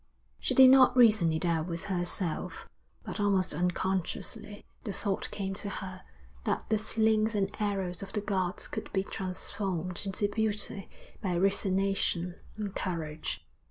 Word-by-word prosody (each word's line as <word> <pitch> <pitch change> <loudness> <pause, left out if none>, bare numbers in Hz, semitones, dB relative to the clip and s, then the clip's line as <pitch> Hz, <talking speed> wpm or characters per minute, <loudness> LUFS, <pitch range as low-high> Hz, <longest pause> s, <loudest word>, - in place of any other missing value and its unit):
She - - -1
did 260 -1 +9
not 260 -1 +6
reason 215 -8 +6
it 160 +3 -1
out 165 -1 +1
with 170 -1 -4
herself, 175 -3 -1 0.4
but - - -5
almost 195 -3 +2
unconsciously 190 +4 -2 0.2
the 215 - -3
thought 195 0 -2
came 195 -1 -3
to 200 +1 -3
her 185 -1 -6 0.4
that - - -1
the 220 -1 +2
slings 220 0 +2
and 195 -1 0
arrows 195 -4 -1
of 195 0 -7
the 210 - -1
gods 190 -3 -1
could - - -6
be 190 -1 +1
transformed 185 -2 -2
into 200 +1 0
beauty 210 -1 -1 0.3
by 180 -3 0
resignation 195 -2 +1 0.2
and 205 -2 -4
courage. 155 - -3
195 Hz, 145 wpm, -30 LUFS, 180-210 Hz, 0.4 s, did